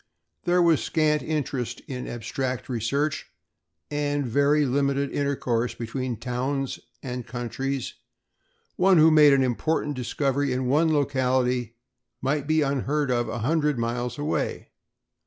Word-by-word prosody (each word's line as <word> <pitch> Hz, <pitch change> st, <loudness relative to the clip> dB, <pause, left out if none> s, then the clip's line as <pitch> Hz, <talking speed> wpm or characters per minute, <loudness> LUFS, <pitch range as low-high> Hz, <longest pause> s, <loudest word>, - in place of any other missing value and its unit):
There 175 Hz, 0 st, +4 dB
was 165 Hz, -7 st, +4 dB
scant 150 Hz, -1 st, +1 dB
interest 130 Hz, -5 st, -3 dB
in 125 Hz, -2 st, -6 dB
abstract 125 Hz, +2 st, -4 dB
research 140 Hz, +5 st, -1 dB, 0.6 s
and 145 Hz, -1 st, -1 dB
very 145 Hz, +4 st, +3 dB
limited 140 Hz, +1 st, 0 dB
intercourse 125 Hz, -4 st, -1 dB
between 120 Hz, +1 st, -4 dB
towns 130 Hz, +3 st, -2 dB, 0.2 s
and 125 Hz, -2 st, -5 dB
countries; 125 Hz, +3 st, -3 dB, 0.8 s
one 185 Hz, 0 st, +5 dB
who 160 Hz, +1 st, +7 dB
made 150 Hz, -2 st, +7 dB
an 135 Hz, -1 st, +4 dB
important 145 Hz, +4 st, 0 dB
discovery 135 Hz, +2 st, -1 dB
in 130 Hz, 0 st, -1 dB
one 155 Hz, +5 st, +3 dB
locality 125 Hz, -4 st, +1 dB, 0.4 s
might 140 Hz, +2 st, -1 dB
be 155 Hz, 0 st, +3 dB
unheard 140 Hz, +1 st, 0 dB
of 120 Hz, -1 st, 0 dB
a -, -, -3 dB
hundred 150 Hz, -1 st, +1 dB
miles 120 Hz, +2 st, -2 dB
away. 145 Hz, +2 st, -2 dB
135 Hz, 125 wpm, -25 LUFS, 125-150 Hz, 0.8 s, who